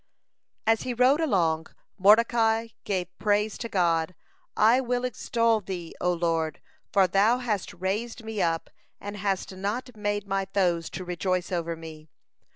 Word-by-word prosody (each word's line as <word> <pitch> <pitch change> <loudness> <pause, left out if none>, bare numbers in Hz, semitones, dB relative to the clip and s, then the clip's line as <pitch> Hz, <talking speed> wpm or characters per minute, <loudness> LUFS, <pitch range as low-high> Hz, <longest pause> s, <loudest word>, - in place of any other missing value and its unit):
(171) 225 - +6
As 225 - -4
he 250 - -3
rode 260 +6 +4
along, 165 - +1 0.3
Mordecai 225 +2 +4 0.2
gave 185 -2 -2
praise 210 0 +1
to 230 - -4
God: 170 -2 +1 0.4
"I 230 +5 +5
will 245 0 -1
extol 230 -2 +1
Thee, 180 -4 -6
O 180 - +2
Lord; 165 -3 -1 0.3
for 195 -1 +5
Thou 200 +6 +3
hast 220 -6 -2
raised 210 +6 -3
me 220 -2 -3
up, 165 -1 -1 0.3
and 205 +1 -6
hast 195 -1 -2
not 220 +6 -3
made 205 -1 -2
my 195 -1 -1
foes 175 -4 +1
to 185 - -6
rejoice 180 +1 -1
over 170 -2 -2
me. 160 -1 -11
200 Hz, 155 wpm, -27 LUFS, 175-225 Hz, 0.4 s, 171